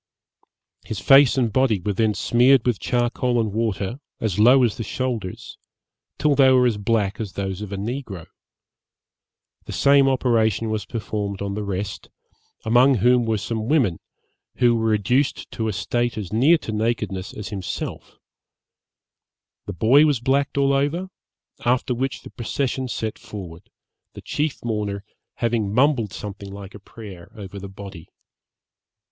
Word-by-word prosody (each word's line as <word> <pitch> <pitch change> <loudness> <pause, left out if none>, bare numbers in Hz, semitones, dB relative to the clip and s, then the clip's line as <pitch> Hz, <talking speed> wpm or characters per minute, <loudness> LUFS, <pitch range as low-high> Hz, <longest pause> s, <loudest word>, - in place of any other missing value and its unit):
His 110 - -5
face 135 +7 +6
and 120 -5 +1
body 130 -5 +2
were 100 +3 -2
then 110 +1 +1
smeared 125 +1 +4
with 120 -5 +1
charcoal 120 0 0
and 110 -3 -1
water, 110 +1 -2 0.2
as 105 -3 -2
low 125 +4 +6
as 115 -2 +1
the 115 - -3
shoulders, 115 -4 -4 0.6
till 150 0 +2
they 135 -1 +5
were 130 -1 +5
as 115 -4 +1
black 105 -1 0
as 105 -4 -5
those 95 0 -4
of 105 -2 -6
a 100 - -4
negro: 105 - -5 1.4
the - - -7
same 140 -1 +4
operation 115 -4 +1
was 105 -2 -3
performed 105 -3 -4
on 100 0 -3
the 105 - -3
rest, 100 0 -5 0.6
among 125 +4 +5
whom 120 +2 +3
were 110 -1 0
some 110 +1 -4
women, 125 - +2 0.6
who 120 -2 +3
were 115 -1 0
reduced 120 +6 0
to 110 -2 -3
a - - 0
state 120 +5 -1
as 105 -2 -5
near 140 +10 +5
to 130 - -7
nakedness 105 -3 -2
as 105 - -7
himself; 100 -3 -6 1.5
the 100 - -4
boy 120 - +5
was 145 -5 +2
blacked 135 +3 0
all 140 0 +3
over, 155 +7 -1 0.5
after 125 +1 +1
which 130 +2 -3
the - - -11
procession 130 +2 -2
set 110 -3 -4
forward, 100 -8 -10 0.5
the - - -9
chief 150 -4 -3
mourner 105 -3 -2 0.3
having 115 -4 -1
mumbled 125 -3 +2
something 100 -1 -8
like 100 -1 -9
a 105 - -10
prayer 100 -4 -12
over 100 -1 -8
the 100 0 -8
body. 95 -4 -10
110 Hz, 155 wpm, -22 LUFS, 100-125 Hz, 1.5 s, face